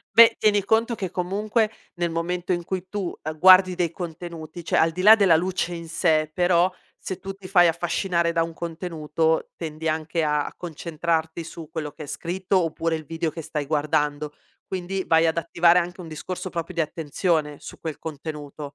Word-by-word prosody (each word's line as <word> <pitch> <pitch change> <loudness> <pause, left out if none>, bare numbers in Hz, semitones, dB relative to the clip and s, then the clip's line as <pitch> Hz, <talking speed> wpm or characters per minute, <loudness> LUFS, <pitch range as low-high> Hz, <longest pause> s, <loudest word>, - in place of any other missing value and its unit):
Beh, 230 +1 +9
tieni 205 -2 +3
conto 225 +3 +2
che 190 -4 -4
comunque 210 +5 0 0.2
nel 175 -1 -1
momento 175 +2 -2
in 175 -1 -1
cui 185 +1 -4
tu 195 -3 -4
a 155 - -3
guardi 185 +3 +6
dei 170 -2 0
contenuti 170 -1 -7
cioè, - - 0
al 165 - +4
di 180 +3 -4
là 215 +3 +10
della 195 -6 +5
luce 180 +1 -1
in 170 -1 -7
sè, 160 -2 +2
però, 175 0 +3 0.3
se 190 - -5
tu 195 +1 -5
ti 195 -1 -12
fai 180 -2 +5
affascinare 170 0 0
da 165 0 +2
un 165 0 -4
contenuto, 160 -1 -2
tendi 160 -1 -4
anche 160 +1 -1
a 150 -1 +1
a - - -9
concentrarti 165 0 -2
su 165 -1 -9
quello 155 -3 -4
che - - -10
è 150 - -7
scritto 180 +6 -1
oppure 165 0 -1
il 155 - -8
video 165 +2 -2
che 165 - -7
stai 150 -2 -4
guardando, 150 0 0 0.3
quindi 190 +1 -3
vai 165 0 +4
ad 160 - 0
attivare 170 +1 +4
anche 180 +1 -3
un 170 - -8
discorso 180 +4 -5
proprio 170 -2 -4
di - - -1
attenzione 155 -1 -1
su - - -10
quel 160 -3 -5
contenuto. 150 -2 -7
170 Hz, 190 wpm, -24 LUFS, 160-180 Hz, 0.3 s, là